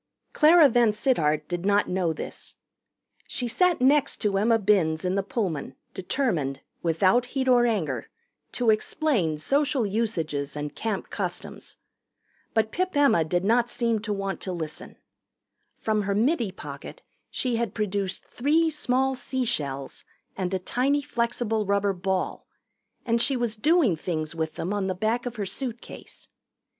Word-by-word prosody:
Clara 315 0 +7
VanSittart 215 - +2
did 175 -1 -3
not 205 +1 +3
know 180 -2 0
this. 160 - -6 0.7
She 245 - -2
sat 355 +8 +2
next 280 +2 +3
to 205 -2 +1
Emma 225 +2 +4
Binns 185 -6 +2
in 180 - +1
the 200 - +1
Pullman, 180 - -3 0.2
determined, 180 - -1 0.2
without 185 +9 +2
heat 260 +1 -2
or 245 -1 +5
anger, 160 - -2 0.4
to 240 -3 +3
explain 215 - 0
Social 275 - +1
Usages 165 -10 -2
and 150 0 -4
Camp 215 -4 -3
Customs. - - -5 0.8
But 220 -1 +2
Pip 370 -1 -1
Emma 230 - +4
did 175 +3 -1
not 235 +3 +3
seem 230 -2 0
to 215 0 -5
want 195 -1 -3
to 185 - -4
listen. 160 -4 -6 0.8
From 215 -1 0
her 200 0 -1
middy 235 - +1
pocket - - -9 0.3
she 245 -3 -1
had 230 -3 -2
produced 200 -3 -2
three 315 +5 +1
small 265 -2 +1
sea 260 0 -2
shells 140 - -3 0.3
and 185 -1 -2
a 190 - +1
tiny 270 +9 0
flexible 235 -3 -1
rubber 200 0 +2
ball, 190 0 -2 0.6
and 230 -1 +2
she 270 +1 +2
was 240 -2 -1
doing 290 - +3
things 155 -1 -3
with 160 -1 -3
them 185 +5 -3
on 200 -2 -1
the 185 - -1
back 225 +6 -1
of 245 - -5
her 205 -3 -3
suitcase. 240 +4 -6
215 Hz, 150 wpm, -26 LUFS, 180-245 Hz, 0.8 s, Clara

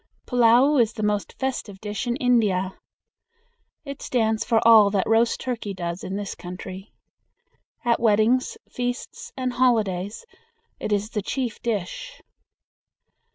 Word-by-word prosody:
Pullao 245 +3 +5
is 230 0 +1
the 215 - -5
most 210 -1 -1
festive 245 -7 -3
dish 210 +3 -4
in 240 - 0
India. 210 -8 +2 1.1
It 280 -1 -7
stands 220 -3 0
for 225 -2 +2
all 220 -3 +8
that 195 -2 0
roast 225 +1 +3
turkey 230 -6 -4
does 175 0 -4
in 190 - -4
this 200 -1 -4
country. 185 +2 -9 0.9
At 235 -1 +2
weddings, 230 +3 +2
feasts, 245 0 -5
and 255 -1 -2
holidays 215 - 0 0.5
it - - -4
is 205 +2 0
the 210 - -2
chief 245 +3 -3
dish. 230 - -4
220 Hz, 130 wpm, -24 LUFS, 200-245 Hz, 1.1 s, all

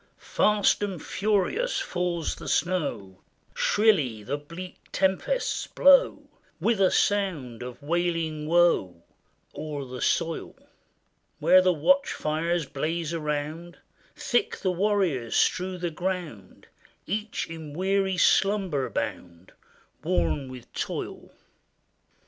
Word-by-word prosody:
] - - -41
Fast 210 -1 +2
and 195 -4 -3
furious 215 - 0
falls 180 - -2
the - - -10
snow; 145 - -1 0.3
Shrilly 150 - +2
the 135 +6 -2
bleak 170 +5 -9
tempests 195 - 0
blow, - - +5 0.4
With 225 -4 +1
a 190 - +5
sound 170 - 0
of 125 +3 -8
wailing 165 -1 -1
woe, 160 - +2 0.5
O'er 150 -2 -5
the 125 -1 -8
soil; 165 -1 -1 0.8
Where 185 - +6
the 185 0 +3
watch 275 - +2
fires 165 +2 -1
blaze 160 +4 -3
around, 155 +2 -4 0.4
Thick 240 - 0
the 185 - 0
warriors 180 - 0
strew 185 0 +1
the 175 -1 -3
ground, 165 - -5 0.4
Each 210 +3 -3
in 160 -2 -8
weary 190 +2 0
slumber 190 -8 +2
bound, 85 +1 -5 0.5
Worn 90 - 0
with 130 -2 -11
toil. - - -5
170 Hz, 110 wpm, -26 LUFS, 145-190 Hz, 0.8 s, Where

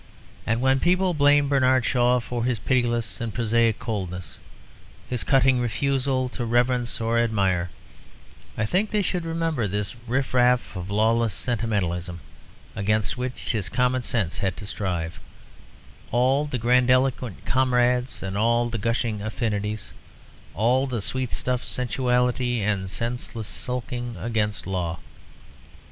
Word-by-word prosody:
And 115 +2 +1
when 130 +1 +3
people 180 +3 +2
blame 145 -1 +4
Bernard 130 -2 +3
Shaw 125 0 +3
for 120 0 -4
his 125 -1 0
pitiless 120 -1 0
and 115 -1 -2
prosaic 115 0 +2
coldness, 90 - -5 0.7
his 125 -2 -2
cutting 130 -2 +4
refusal 130 +2 0
to 120 - -5
reverence 120 +1 +1
or 115 +1 +1
admire, 95 -6 +1 0.9
I 110 - +1
think 195 - +1
they 210 -1 +1
should 180 -3 -2
remember 165 -8 -1
this 100 0 -2
riff 130 +3 -1
raff 125 -3 +3
of 90 0 -5
lawless 110 +2 +2
sentimentalism 95 -7 -1 0.6
against 105 0 0
which 125 0 -3
his 105 -4 -2
commonsense 120 -7 0
had 95 -3 -1
to 105 - -7
strive, 90 -5 -3 0.9
all 130 +5 +2
the 145 -3 -2
grandiloquent 125 -1 +2
"comrades" 125 -2 +1
and 95 0 -4
all 120 +3 +2
the 115 - -2
gushing 115 -1 -1
"affinities," 105 -2 -3 0.6
all 125 +5 +2
the 125 -3 -2
sweetstuff 125 0 -1
sensuality 125 -1 0
and 100 -2 -1
senseless 115 0 -4
sulking 120 -1 -5
against 110 -3 -1
law. 90 -3 -2
120 Hz, 125 wpm, -24 LUFS, 105-125 Hz, 0.9 s, blame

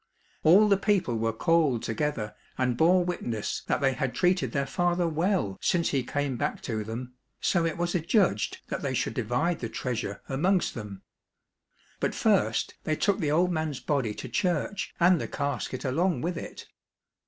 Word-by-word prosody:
All 190 +7 +6
the 200 -1 +4
people 195 - +1
were 115 0 0
called 150 -1 +2
together 115 -3 -2 0.2
and 125 -2 +1
bore 175 +6 +4
witness 120 -12 -3
that - - 0
they 135 -1 +3
had 130 0 -2
treated 180 0 +2
their 140 -2 0
father 175 +1 +1
well 165 - 0
since 170 -2 +2
he 135 - +1
came 140 0 -2
back - - -2
to 110 -2 -2
them, 120 +4 -6 0.3
so 170 -3 +2
it 165 - -3
was 175 0 -1
adjudged 175 - +1
that - - -3
they - - -2
should - - -1
divide 125 +10 0
the 115 - -4
treasure 110 -3 -4
amongst 175 +8 +1
them. 105 -4 -8 1.0
But - - -1
first - - +2
they 155 - 0
took 200 +4 +1
the 150 - 0
old 175 +4 +3
man's 155 -5 -2
body 130 -8 -1
to - - -6
church 175 - -1
and 175 -1 +5
the - - -3
casket 140 -2 -3
along 160 +2 +1
with 175 +2 -2
it. - - -7
150 Hz, 175 wpm, -28 LUFS, 125-175 Hz, 1.0 s, All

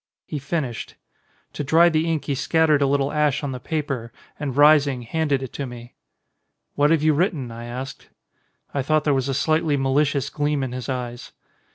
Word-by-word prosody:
He 150 - -4
finished. 140 -4 -4 0.6
To - - -3
dry 160 +4 +5
the 160 0 +1
ink 160 -2 -1
he 145 - -1
scattered 155 +1 +2
a 140 - +3
little 140 0 +1
ash 150 -2 +1
on 140 - -2
the 130 - -5
paper 140 -5 -3 0.3
and 140 -3 -4
rising 145 -4 +5
handed 145 +1 0
it 130 - -7
to 140 - -4
me. 120 -1 -10 0.8
"What 145 +1 +3
have 160 -2 +3
you 155 0 +4
written?" 150 - 0
I 115 +1 -8
asked. 130 +3 -7 0.6
I 140 - 0
thought 155 +3 +1
there 150 - +2
was 135 0 0
a 135 - -1
slightly 155 +1 +1
malicious 140 0 +1
gleam 145 -1 0
in 130 - -3
his 125 -1 -6
eyes. 120 -2 -5
140 Hz, 190 wpm, -23 LUFS, 130-150 Hz, 0.8 s, dry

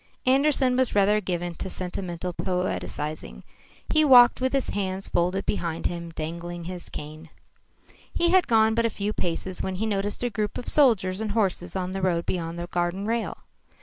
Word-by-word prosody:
Andersen 265 -1 +3
was 260 -3 +1
rather 205 +1 +4
given 175 -2 -3
to 190 - -6
sentimental 180 -1 -5
poetising. 170 -4 -3 0.4
He 310 0 +4
walked 250 -4 +7
with 260 0 +1
his 275 -1 0
hands 190 -1 -2
folded 180 +3 0
behind 165 -4 -2
him, 170 -1 -3
dangling 170 +2 -6
his 180 +1 -7
cane. 155 +2 -9 0.8
He 345 0 +2
had 370 -1 +4
gone 220 -1 +4
but 230 +1 +1
a - - -2
few 205 0 -3
paces 180 +1 -2
when 190 - -3
he 210 +4 -2
noticed 205 +1 -2
a 245 - 0
group 210 -2 -2
of 245 - -7
soldiers 215 -9 +3
and 215 -2 -2
horses 190 -5 -1
on 185 -1 -2
the 195 0 -3
road 170 -2 +1
beyond 170 -2 -3
the 170 - -4
garden 175 +2 -2
rail. 230 +1 -2
190 Hz, 180 wpm, -25 LUFS, 175-225 Hz, 0.8 s, walked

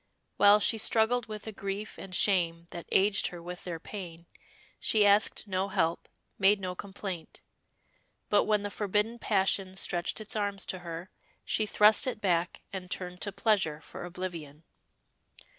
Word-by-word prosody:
While 205 +1 +7
she 220 +2 +2
struggled 225 +2 +2
with 215 -1 -7
a 220 - -5
grief 200 +1 -5
and 190 -1 -7
shame 170 -5 +2
that 170 -2 -8
aged 195 +1 +3
her 175 - -7
with 175 +1 -8
their 170 -3 -4
pain, 170 -3 -8 0.5
she 215 -2 +3
asked 205 +1 +3
no 190 0 -1
help, 170 -4 -1 0.3
made 200 +1 +5
no 185 -1 -3
complaint; 190 -2 -7 0.8
but 205 - +3
when 210 -1 +2
the 205 - -4
forbidden 210 +4 -1
passion 190 -2 +1
stretched 175 0 0
its 215 0 -4
arms 200 -2 0
to 185 - -4
her, 170 +1 -7 0.3
she 215 - +1
thrust 210 +6 +5
it 250 - -2
back 180 -3 0
and 185 -2 -6
turned 180 0 -5
to 205 - -1
pleasure 190 -8 +1
for - - -9
oblivion. 170 -4 -7
195 Hz, 160 wpm, -30 LUFS, 180-210 Hz, 0.8 s, While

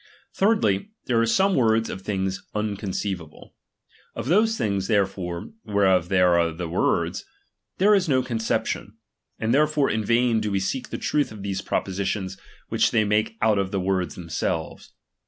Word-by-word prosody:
Thirdly, 195 - +2 0.2
there 115 -2 +2
are 115 - +2
some 190 +13 +3
words 115 -5 +3
of 95 - -6
things 95 -1 -2
unconceivable. 100 -5 -4 0.6
Oj - - -4
those 215 - +3
things, 100 - -1
therefore, 95 -5 -1
whereof 95 -4 +2
they 95 - +2
are 85 -2 +4
the 85 +1 -5
wordSi 85 - 0 0.5
there 205 +3 +5
is 190 -5 +2
no 130 -2 +3
conception; 115 -3 -2 0.4
and 115 +1 0
therefore 150 0 +3
in 110 0 -1
vain 115 +1 +2
da 105 - -1
we 100 -1 0
seek 95 +7 -2
for - - -27
the - - -12
truth 145 -5 +1
of 105 -2 -9
those 100 -1 -2
propositions, 95 0 -2 0.4
whicU - - +3
they 110 - +2
make 105 +2 0
out 110 -2 +3
of 95 -1 -1
the 100 - -1
words 95 -1 -1
themselves. 85 -1 -4
105 Hz, 165 wpm, -24 LUFS, 95-120 Hz, 0.6 s, there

